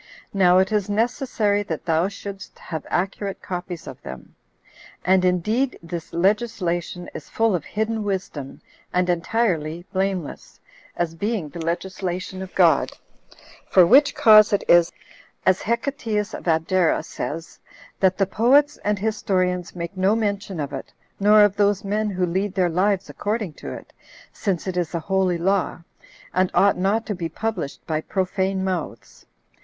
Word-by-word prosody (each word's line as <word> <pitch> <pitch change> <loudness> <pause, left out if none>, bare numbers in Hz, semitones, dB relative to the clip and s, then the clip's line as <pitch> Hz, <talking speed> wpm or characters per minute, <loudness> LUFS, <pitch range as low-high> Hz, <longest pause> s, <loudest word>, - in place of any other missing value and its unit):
Now 185 -2 +5
it 190 +2 +3
is 210 -2 0
necessary 220 -2 +1
that 165 -6 -5
thou 165 +1 +2
shouldst 200 -1 -8
have 160 -2 -6
accurate 195 +2 -2
copies 180 -2 -6
of - - -9
them. 65 -1 -10 0.7
And 185 +1 +4
indeed 215 +9 +1
this 165 -1 -6
legislation 180 -2 -1
is - - -9
full 225 -2 +1
of 170 -4 -1
hidden 220 +1 -2
wisdom, 185 -9 -4 0.3
and 180 0 +2
entirely 175 -3 -1
blameless, 190 -4 -3 0.4
as 170 -2 -1
being 200 -2 -2
the 170 +2 -7
legislation 185 +2 -3
of 190 0 -8
God; - - +4 0.8
for 185 -2 +7
which 275 +9 +5
cause 215 -1 +7
it 205 - +1
is, 170 -1 +5 0.5
as 185 0 +3
Hecateus 230 -3 -2
of - - -7
Abdera 165 +2 +2
says, 165 +2 -6 0.4
that 190 -1 +3
the 195 - +3
poets 265 +9 +3
and 210 0 +1
historians 185 -4 -1
make 170 +2 -5
no 190 +3 +2
mention 200 -4 -2
of 145 -1 -4
it, 135 - -6 0.3
nor 210 +1 +6
of 205 -1 +3
those 205 -1 +2
men 210 +2 -1
who 185 -2 0
lead 190 +3 -2
their 185 -3 +2
lives 195 +3 +1
according 210 -5 -3
to - - -6
it, - - -10 0.4
since 190 -5 -2
it 185 -2 -3
is 175 -1 -1
a - - 0
holy 185 +1 +1
law, 190 +1 0 0.5
and 185 0 +2
ought 200 +1 +5
not 205 +4 +1
to 210 - -2
be 170 -3 -4
published 175 -7 -4
by 155 -1 -1
profane 190 +1 -1
mouths. 185 -4 -5
190 Hz, 155 wpm, -23 LUFS, 175-210 Hz, 0.8 s, for